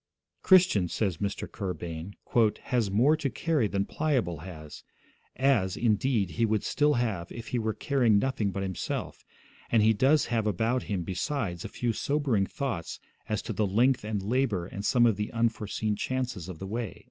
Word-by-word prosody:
'Christian,' 180 - +5
says 95 -1 -1
Mr. 100 +3 -3
Kerr 95 -4 -4
Bain, 85 +3 -7 0.5
'has 120 -5 0
more 125 +10 +4
to 150 -3 -2
carry 150 -2 0
than 100 0 -1
Pliable 125 - -1
has, 80 -3 -10 0.5
as, 120 -9 +2
indeed, 110 -3 +1
he 95 - -1
would 110 -2 +1
still 150 0 +2
have 110 -8 -2
if 115 -1 -8
he 125 - 0
were 110 -1 -1
carrying 125 -7 +2
nothing 110 -3 0
but 95 +1 -3
himself; 95 -2 -4 0.5
and 115 -2 +4
he 110 +1 +5
does 135 +7 +3
have 110 -2 +1
about 110 +6 +1
him, 95 -4 -1
besides, 95 - -3
a - - -4
few 120 -2 -1
sobering 130 -6 0
thoughts 125 - -4 0.3
as 105 -2 -1
to - - -4
the 105 - +1
length 120 +6 +2
and 105 -2 -3
labour 110 -5 0
and 100 +2 -6
some 120 +1 +4
of 110 -4 +3
the 105 0 -3
unforeseen 110 -2 -1
chances 125 -8 -3
of 90 - -7
the 95 - -7
way.' 110 +1 -4
110 Hz, 180 wpm, -28 LUFS, 95-125 Hz, 0.5 s, Christian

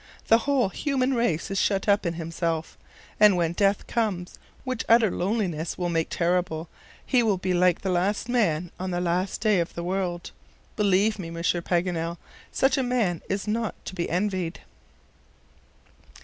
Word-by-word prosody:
The 225 - +7
whole 260 -8 +3
human 270 - 0
race 200 -8 0
is 195 - 0
shut 195 0 +1
up 200 -2 +3
in 170 - -2
himself, 165 -1 -3 0.4
and 210 -3 +6
when 170 -1 +1
death 200 +2 +1
comes, 200 -7 -2 0.2
which 255 -3 -3
utter 225 -3 +5
loneliness 180 -5 -2
will 175 -1 -1
make 165 -1 0
terrible, 175 -2 0 0.4
he 255 -3 +3
will 215 -4 +2
be 185 0 -1
like 180 -1 +3
the 190 - -1
last 195 +5 0
man 180 -9 +1
on 185 +1 -3
the 175 -1 -1
last 180 +2 -1
day 215 -4 +3
of 170 - -3
the 170 - -4
world. 180 -1 -2 0.4
Believe 205 +1 +2
me, 170 -3 -5
Monsieur 170 +1 -1
Paganel, 170 -1 -1 0.3
such 270 +1 +2
a - - +2
man 235 -9 0
is 195 +2 -2
not 220 0 -1
to - - -6
be 175 -2 -3
envied." 185 -2 -1
185 Hz, 165 wpm, -26 LUFS, 175-215 Hz, 0.4 s, The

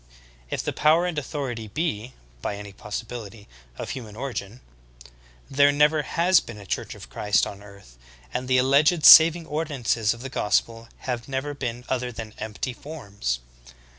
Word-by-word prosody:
If - - -3
the - - -2
power 160 +3 +3
and 175 -2 -2
authority 130 -6 -5
be, 125 -2 -3 0.3
by 100 - -3
any 100 -1 -9
possibility, 110 0 -7 0.3
of - - -5
human 110 -5 -7
origin, 120 -3 -5 0.9
there 140 +1 +4
never 150 +2 +3
has 170 +4 +3
been 115 - -10
a 100 - -11
Church - - -4
of - - -11
Christ 105 +12 +1
on 100 0 -8
earth, 100 -13 -16 0.3
and 125 - -3
the 130 0 +3
alleged 145 +6 +4
saving 165 +1 +9
ordinances 135 -9 -1
of 115 - -12
the 135 - -5
gospel 115 -1 0 0.2
have 120 -2 -3
never 135 +2 -3
been 125 -3 -5
other 125 -1 -2
than 110 -2 -8
empty 110 +3 -4
forms. 100 - -5
125 Hz, 160 wpm, -25 LUFS, 105-145 Hz, 0.9 s, saving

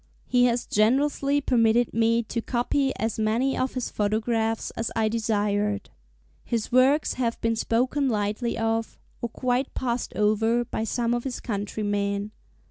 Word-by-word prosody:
He 245 -1 +3
has 240 0 +1
generously 275 +6 +2
permitted 235 -2 +2
me 230 +1 +2
to 230 +1 -3
copy 265 +3 0
as 225 0 -2
many 230 +5 +1
of 260 +1 -1
his 255 - -3
photographs 220 +2 0
as 225 - -3
I 220 -1 +2
desired. 210 -2 -1 0.5
His 230 -3 -2
works 265 +4 +4
have 235 -1 -1
been 230 0 +1
spoken 255 +5 +1
lightly 215 +2 -1
of, 225 0 -1 0.2
or 235 - -2
quite 255 +3 -1
passed 245 -2 -2
over, 225 +3 +2
by 220 -1 -3
some 235 +1 0
of 240 0 -1
his 265 -3 -4
countrymen. 205 -1 -2
230 Hz, 145 wpm, -25 LUFS, 215-245 Hz, 0.5 s, works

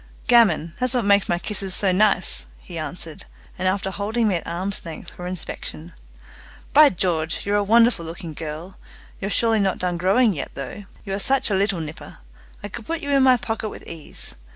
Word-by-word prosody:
"Gammon, 195 -9 +4
that's 255 0 +2
what 240 -4 +1
makes 200 -1 +4
my 175 - +2
kisses 195 0 -1
so 195 -2 +3
nice!" 185 - +2
he - - -8
answered; - - -6 0.3
and, 185 - +1
after 190 0 0
holding 215 +4 0
me 205 - +2
at - - -8
arm's 185 +4 -3
length 165 +1 -8
for 180 - -7
inspection, 175 -1 -6 0.8
"By 300 0 +8
George, 165 -4 -1
you're 205 +1 +1
a 205 - +2
wonderful 230 -2 +4
looking 165 0 -7
girl! 160 +4 -7 0.4
You're 195 - -3
surely 225 +1 +2
not 195 -2 +1
done 180 -1 -1
growing 200 +6 +3
yet, 145 - -6
though! 140 +9 -7 0.2
You 195 - -4
are 195 - -1
such 265 +1 +2
a - - +3
little 195 -3 +1
nipper. 155 0 -8 0.5
I - - -3
could 215 +2 -8
put 330 0 -2
you 285 -2 -3
in 275 -1 +4
my 260 -1 +6
pocket 225 -1 -3
with - - -10
ease. 160 - -7
195 Hz, 200 wpm, -23 LUFS, 170-220 Hz, 0.8 s, By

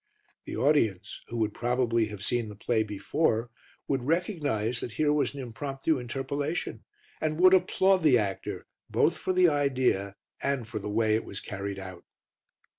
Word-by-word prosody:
The - - -5
audience, 110 -7 +1
who 120 - -5
would 110 -2 0
probably 120 -2 +1
have 105 -2 -6
seen 120 -3 0
the 105 - -9
play 110 +2 0
before, 110 +3 0 0.4
would 135 -3 0
recognize 145 - 0
that 120 - -5
here 150 +2 +2
was 145 -1 0
an - - -6
impromptu 135 +4 -2
interpolation, 140 +6 -3 0.4
and 155 0 -1
would 185 +1 +7
applaud 190 +1 +4
the 150 -6 +5
actor 100 -4 -3 0.2
both - - +2
for - - -2
the 185 -1 +5
idea 130 - +1 0.3
and 135 -5 -1
for 110 -1 -4
the 105 +1 -5
way 110 +1 +2
it 110 - +1
was 100 - -5
carried 100 0 -5
out. 95 -2 -8
125 Hz, 165 wpm, -28 LUFS, 110-145 Hz, 0.4 s, would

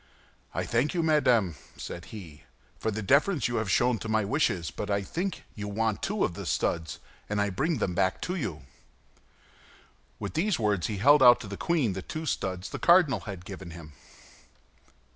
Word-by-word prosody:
"I - - 0
thank 120 +8 0
you, 170 - +1
madame," 125 - +3 0.2
said 85 - -7
he, 85 -9 -10 0.4
"for - - -1
the 110 0 -3
deference 140 - +3
you 120 - -2
have 110 -3 -1
shown 120 +3 +2
to 115 - -6
my 110 -1 +2
wishes, 100 - 0
but 105 - -5
I 100 -1 +1
think 180 - -3
you 105 -1 -6
want 110 +1 -1
two 210 +1 0
of - - -3
the - - -7
studs, 80 -2 -1 0.3
and 105 0 -1
I 100 0 +1
bring 155 - 0
them 95 -5 -1
back 95 +1 +1
to 180 - -2
you." 95 - -4 1.5
With 100 -2 -5
these 185 +3 +1
words 105 -6 +1
he 105 - -3
held 145 +8 +6
out 120 -2 +8
to - - -7
the 100 - -5
queen 145 - 0
the 95 - -4
two 155 - -6
studs 95 - -2
the - - -5
cardinal 170 - +5
had 95 -3 -7
given 95 -2 -8
him. 80 -3 -11
110 Hz, 190 wpm, -28 LUFS, 95-145 Hz, 1.5 s, out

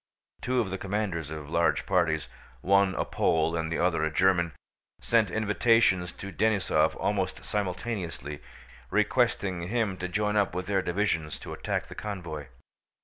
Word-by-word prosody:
Two 125 0 0
of 105 -6 -1
the 95 - -3
commanders 95 -6 -2
of 75 -2 -6
large 85 +2 +1
parties—one 85 +2 +1
a - - 0
Pole 80 0 +1
and 80 -1 -2
the 85 - 0
other 85 -3 +1
a 80 - +2
German—sent 95 - 0
invitations 105 -3 +3
to 100 - -8
Denísov 95 -6 +2
almost 95 -2 -1
simultaneously, 90 - -3 0.5
requesting 105 -4 +1
him 110 -3 0
to 90 - -3
join 105 +3 0
up 100 -4 +1
with 90 0 -2
their 100 -1 +1
divisions 85 -6 -1
to - - -8
attack - - -2
the - - -9
convoy. 85 -9 -6
95 Hz, 145 wpm, -28 LUFS, 80-105 Hz, 0.5 s, invitations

